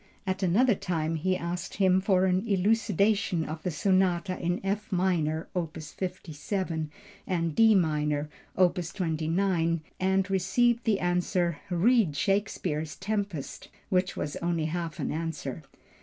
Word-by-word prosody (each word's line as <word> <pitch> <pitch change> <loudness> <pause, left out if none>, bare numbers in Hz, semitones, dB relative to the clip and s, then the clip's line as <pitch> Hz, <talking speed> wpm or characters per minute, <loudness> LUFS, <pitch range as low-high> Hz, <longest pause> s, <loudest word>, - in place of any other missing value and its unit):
At 190 0 -2
another 215 +7 +4
time, 165 -4 -2
he 185 +4 0
asked 175 +2 -4
him 190 -1 +3
for 190 -1 +3
an 185 +4 +1
elucidation 200 -3 +2
of 155 +1 -6
the 180 - -2
Sonatas 185 +2 +1
in 175 +1 0
F 205 +2 -2
minor 170 -4 0
(opus 160 -3 -4
57) 175 -2 -3 0.4
and 170 -3 0
D 225 -1 +6
minor 150 -4 +1 0.3
(opus 175 -2 +2
29), 165 0 0 0.2
and 190 0 +2
received 235 +6 +2
the 215 -4 +2
answer 175 -2 0
"read 190 - +3
Shakespeare's 165 -5 -1
Tempest," 200 -6 -4 0.2
which 185 0 +1
was 145 - -3
only 170 -2 -1
half 165 0 -3
an - - -2
answer. 160 -2 -4
180 Hz, 130 wpm, -28 LUFS, 165-195 Hz, 0.4 s, D